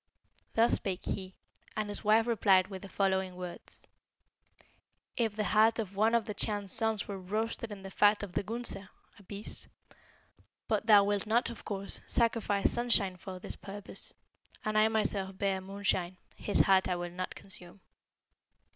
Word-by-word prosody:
Thus 230 +1 +4
spake 190 -2 -2
he, 190 -1 -4 0.4
and 215 -1 0
his 205 - -3
wife 220 +1 +5
replied 195 -5 +4
with 190 -2 -7
the 195 - -9
following 190 -2 0
words, 180 -1 -8 1.3
'If 225 -3 0
the 215 - 0
heart 220 +2 +4
of 205 -4 -4
one 220 +3 +3
of 230 - +2
the 210 - -4
Chan's 205 -1 0
sons 225 -2 +1
were 200 -1 -5
roasted 220 +4 -2
in 195 -2 -8
the 195 - -8
fat 205 +1 +4
of 195 -3 -6
the - - +1
Gunsa 225 -2 -1 0.3
(a - - -15
beast); 200 +2 -3 1.0
but - - 0
thou 205 -2 +8
wilt 205 +1 0
not, 235 +3 +2
of 235 - -10
course, 200 -1 -3
sacrifice 225 -4 +2
Sunshine 230 -6 +1
for 185 +1 -8
this 180 - -7
purpose; 200 0 -5 0.5
and 215 0 -1
I 215 0 +6
myself 200 -3 0
bare 195 -1 0
Moonshine, 190 -2 -1 0.2
his 205 - +2
heart 190 -1 +4
I 180 - 0
will 175 0 -4
not 185 +1 -5
consume. 190 -1 -7
200 Hz, 165 wpm, -31 LUFS, 190-220 Hz, 1.3 s, thou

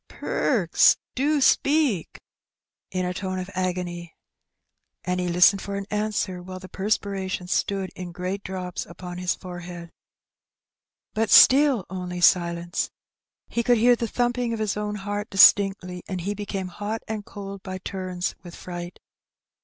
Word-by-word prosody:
"Perks, - - +2 0.2
do 290 +3 +1
speak!" 275 - +2 0.7
in 185 -1 -2
a 180 - -2
tone 185 0 -4
of 185 +1 -5
agony. 175 -2 -3 0.9
And 180 0 -1
he 180 - -1
listened 180 +3 +5
for 200 - -5
an 200 0 -4
answer, 210 -3 -1
while 185 +1 -8
the 185 0 -10
perspiration 195 -2 -2
stood 195 +1 -1
in 180 -1 -7
great 185 +3 -4
drops 185 -2 -4
upon 180 +1 -8
his 180 0 0
forehead. 175 -2 -9 1.2
But 220 0 0
still 270 -7 +7
only 180 -1 -5
silence. 170 -1 +2 0.6
He 235 - -1
could 240 +1 +3
hear 240 +2 +5
the 230 0 -3
thumping 245 +1 0
of 225 - -3
his 215 -2 -1
own 210 0 -3
heart 205 +1 -4
distinctly, 195 -2 +5
and 185 -2 -4
he 200 +4 -2
became 195 -2 -4
hot 210 +4 -5
and 215 -1 -4
cold 200 -1 -8
by 185 -1 -6
turns 185 -1 -4
with 175 -2 -11
fright. 175 -1 -7
190 Hz, 145 wpm, -25 LUFS, 180-210 Hz, 1.2 s, still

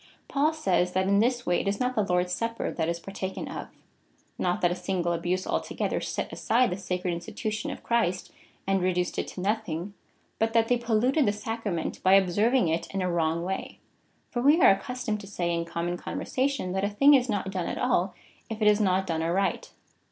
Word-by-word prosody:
Paul 290 +3 +2
says, 185 - +1
that 185 0 +1
in 200 0 +4
this 245 +2 +1
way 175 - +2
it - - -5
is 200 +1 0
not 250 0 0
the 220 - +1
Lord's 180 -2 0
supper 230 +3 -2
that 160 -1 -1
is 170 0 -2
partaken 190 +1 -5
of - - -6 0.4
— - - -40 0.3
not 180 0 0
that 175 - +3
a - - -1
single 180 -1 -1
abuse 175 +2 -1
altogether - - -2
set - - -4
aside 240 -2 +2
the 180 - -2
sacred 180 -1 -2
institution 215 +5 -4
of - - -7
Christ, 185 -6 0 0.3
and 195 -1 +1
reduced 180 -1 0
it - - -2
to 180 - -7
nothing, 200 -3 -2 0.5
but 225 0 +1
that 230 -1 +3
they 245 - +4
polluted 240 +4 +2
the - - +4
sacrament 210 -4 -4
by 190 +1 +6
observing 205 +5 +3
it 165 +1 -1
in 195 -1 -2
a - - 0
Avrong 170 -1 0
way. 190 +1 -4 0.5
For 240 - -1
we 290 +6 +5
are - - +8
accustomed 215 +2 -2
to 200 - -10
say, 175 -4 -2
in 170 0 -1
common 170 +1 -3
conversation, 260 -1 -2
that 190 +1 -1
a 200 - +1
thing 275 +8 +5
is 255 -2 +4
not 200 -3 -1
done 185 -3 -2
at - - -3
all, 185 +2 +1 0.3
if 220 -1 -5
it 215 - +3
is 210 0 +5
not 190 -1 +2
done 165 -3 -1
aright. 180 +4 0
195 Hz, 210 wpm, -27 LUFS, 180-225 Hz, 0.5 s, are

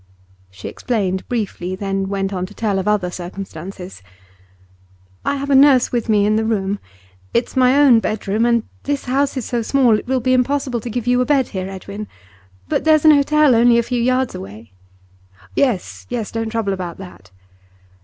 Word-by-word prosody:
She 95 0 -9
explained 195 -6 -2
briefly, 195 -6 -3
then 195 0 -3
went 195 0 -2
on 185 -1 -3
to 205 - -15
tell 205 -4 -1
of 190 - -4
other 200 -4 +1
circumstances. 180 - -8 1.2
'I - - 0
have 280 0 -3
a - - +5
nurse 270 -2 +5
with 240 -1 -2
me 205 -2 +3
in 215 +1 +2
the 220 - +1
room. 200 -3 -1 0.6
It's 235 - 0
my 255 +1 +4
own 275 -5 +6
bedroom, 215 0 -1
and 235 -2 +2 0.2
this 285 -1 -3
house 275 +2 0
is 255 - -3
so 240 -1 -1
small 235 -2 +3
it - - -12
will 260 0 +1
be 255 +2 +1
impossible 255 -1 0
to 240 - -7
give 235 0 -3
you 245 0 +2
a - - +1
bed 275 -3 +1
here, 190 -1 -4
Edwin. 200 +2 -7 0.6
But - - -1
there's 310 -1 +4
an 310 - +9
hotel 300 -1 +4
only 235 +1 +5
a 235 - +2
few 245 0 -2
yards 255 +1 +1
away.' 100 +3 -10 0.8
'Yes, 245 -10 -1
yes; 235 -4 -4
don't 225 -1 -3
trouble 220 -3 -1
about 180 -3 -5
that. 180 - -12
225 Hz, 185 wpm, -19 LUFS, 195-255 Hz, 1.2 s, an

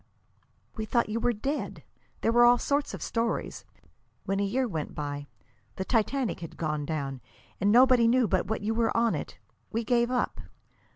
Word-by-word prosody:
"We 220 - -2
thought 235 0 +1
you 225 +2 -1
were 245 - +2
dead. 270 +7 -4 0.4
There 225 - +2
were 240 +1 +5
all 240 0 +7
sorts 285 +3 -1
of - - -7
stories. 230 0 -2 0.6
When 195 0 -1
a - - +1
year 250 +6 0
went 160 -8 -4
by 145 -1 -4 0.5
the 190 - -3
Titanic 245 +2 0
had 165 -2 -9
gone 150 -2 -2
down, 140 -5 -3 0.4
and 200 +2 +3
nobody 250 0 +6
knew 245 0 +4
but 185 -1 0
what 220 - -2
you 220 +2 0
were 230 0 +1
on 230 -1 +3
it - - -5 0.3
we 230 +1 -1
gave 240 +1 +2
up. 250 -1 -1
225 Hz, 180 wpm, -28 LUFS, 190-245 Hz, 0.6 s, all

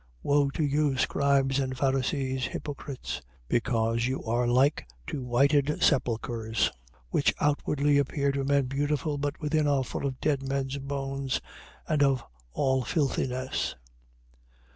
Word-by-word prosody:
23:27. 60 - -33 0.2
Woe 145 -1 +3
to 155 - -2
you, 145 -1 +1
scribes 140 0 +2
and 130 -1 -2
Pharisees, 130 -1 0
hypocrites; 140 -2 -5 0.3
because 115 - +1
you 130 +1 -2
are 120 +2 +1
like 130 - +3 0.2
to 135 - -4
whited 140 +4 +2
sepulchres, 115 -3 +1 0.4
which 140 - +2
outwardly 145 0 +2
appear 140 0 +1
to 140 0 -1
men 140 0 +2
beautiful 145 +2 -1
but 145 +1 -2
within 150 0 +1
are 140 -2 +2
full 140 - -3
of 130 -1 -5
dead 145 -3 +1
men's 135 0 -2
bones 135 -1 -2 0.5
and 150 -2 +1
of 135 -3 +3 0.3
all 130 - +1
filthiness. 130 -3 -1
135 Hz, 135 wpm, -28 LUFS, 130-145 Hz, 0.5 s, Woe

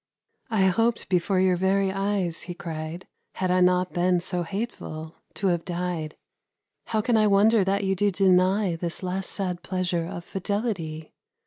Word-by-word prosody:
"I 215 -4 +2
hoped 225 +5 +1
before 185 +1 +2
your 185 -1 +3
very 190 +2 +2
eyes," 195 -3 -1
he 175 - -4
cried, 165 0 -6 0.3
"Had 185 -1 -1
I 185 0 +3
not 180 0 +3
been 180 0 +2
so 180 0 -2
hateful, 170 -5 -5 0.2
to 195 - 0
have 170 -2 0
died. 175 -3 -3 0.7
How 220 -1 +1
can 230 +1 +2
I 215 -1 +4
wonder 205 +1 +5
that 200 +2 0
you 195 0 +1
do 205 +2 +2
deny 185 0 +3
This 170 +2 -4
last 185 +1 -2
sad 180 -3 -3
pleasure 180 -3 -1
of 175 0 -7
fidelity? 190 -6 -3
185 Hz, 160 wpm, -25 LUFS, 175-200 Hz, 0.7 s, wonder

